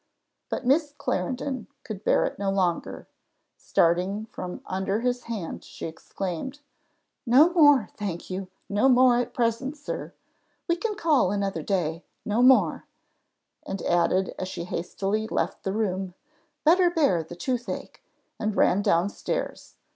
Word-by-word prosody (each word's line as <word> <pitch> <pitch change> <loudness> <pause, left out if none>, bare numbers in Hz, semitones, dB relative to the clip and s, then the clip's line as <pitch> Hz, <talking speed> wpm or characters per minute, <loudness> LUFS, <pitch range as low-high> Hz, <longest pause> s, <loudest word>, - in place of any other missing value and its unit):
But 260 - -3
Miss 290 +2 +2
Clarendon 255 +1 -2 0.2
could 215 -3 -7
bear - - +3
it - - -4
no 200 -1 0
longer; 185 -3 -1 0.5
starting 180 +5 +1
from 180 - -6
under 190 +3 -1
his 245 0 -1
hand, 215 -8 -5
she - - -8
exclaimed, 185 - -5 0.6
"No 285 +8 +5
more, 290 - +6
thank 190 -5 -4
you 185 0 -4 0.2
no 210 +7 +3
more 250 -1 +6
at 245 - -2
present, 245 +5 -1
sir: 290 - -5 0.6
we 340 - +3
can 425 +4 -2
call 310 - +3
another 200 -1 -1
day 170 -4 -1 0.2
no 215 +3 +1
more:" 260 +1 +5 0.8
and 195 - -5
added 180 +2 +2
as 185 - -3
she 185 -2 -5
hastily 195 +5 -2
left - - -2
the 195 - -2
room, 190 -3 -2 0.5
"Better 350 +3 +5
bear 285 - +2
the 160 +2 -9
toothache," 245 +6 -4 0.4
and 215 -1 -1
ran 190 - +3
down 175 -1 +3
stairs. 205 - -4
210 Hz, 140 wpm, -26 LUFS, 185-260 Hz, 0.8 s, more